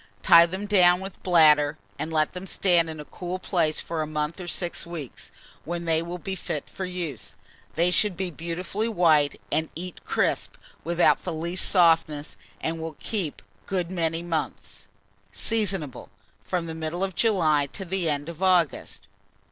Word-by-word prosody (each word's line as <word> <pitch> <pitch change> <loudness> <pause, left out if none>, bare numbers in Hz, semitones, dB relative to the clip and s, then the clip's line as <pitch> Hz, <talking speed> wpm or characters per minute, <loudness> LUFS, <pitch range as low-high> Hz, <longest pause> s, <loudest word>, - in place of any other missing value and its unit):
Tie 170 0 +8
them 190 +4 -5
down 180 -3 +5
with 190 0 -8
bladder, 155 -4 +5 0.2
and 160 - -3
let 155 -1 +2
them 180 +1 -7
stand 175 -3 +2
in 155 -1 -7
a 150 - -7
cool 180 +3 -5
place 170 -4 0
for 165 -1 -3
a 155 - -2
month 150 +3 -3
or 175 - -7
six 175 0 -1
weeks, 170 -6 -8 0.3
when 170 +1 -4
they 160 -1 +2
will 170 +1 -5
be 190 +2 -5
fit 155 -4 -4
for 190 - -4
use. 175 -8 -4 0.4
They 170 +2 +3
should 195 -1 +2
be 185 -1 -2
beautifully 175 +7 -3
white, 160 -8 +3
and 160 0 0
eat 180 +1 -6
crisp, - - 0 0.3
without 170 +2 +3
the 180 - -3
least 170 +3 -1
softness, 165 -5 +3 0.3
and 165 0 -2
will 160 -2 -6
keep 185 - -3 0.2
good 180 -3 -1
many 165 -2 -1
months. 165 -3 -4 0.4
Seasonable 195 - -1 0.3
from 180 -2 -2
the 165 - -5
middle 160 +3 -3
of 195 -1 -2
July 160 -9 +2
to 190 +7 -6
the 180 -2 -1
end 145 0 -2
of 170 +1 -8
August. 180 -5 +1
170 Hz, 170 wpm, -26 LUFS, 160-185 Hz, 0.4 s, Tie